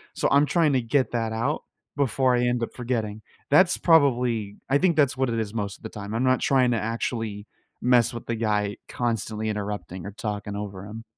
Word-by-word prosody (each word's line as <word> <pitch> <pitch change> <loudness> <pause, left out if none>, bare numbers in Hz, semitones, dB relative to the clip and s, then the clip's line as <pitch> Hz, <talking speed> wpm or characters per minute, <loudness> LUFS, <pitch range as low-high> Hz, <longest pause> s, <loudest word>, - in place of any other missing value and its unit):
So - - +1
I'm 140 +1 +5
trying 160 -1 +3
to 130 - +2
get 130 +3 +1
that 115 -2 -1
out, 125 +7 -1 0.3
before 130 -2 +2
I 120 - +1
end 120 -1 0
up - - -2
forgetting. 110 -4 -3 0.3
That's 180 +5 +5
probably 125 - +3
I 135 - +4
think 175 -2 +3
that's 140 -4 +3
what 130 -1 +1
it 115 -1 -1
is 110 -1 -3
most 100 -3 -3
of - - -28
the 110 - -5
time. 105 0 -7
I'm 120 - 0
not 130 0 +3
trying 130 -3 +3
to 115 - +1
actually 110 -2 -3 0.4
mess 125 -2 +4
with 120 - -7
the 115 - -1
guy 105 -2 0
constantly 110 -2 -2
interrupting 100 -3 -4
or 100 - -5
talking 105 -1 -5
over 100 -2 -6
him. 110 +2 -8
115 Hz, 210 wpm, -25 LUFS, 105-130 Hz, 0.4 s, I'm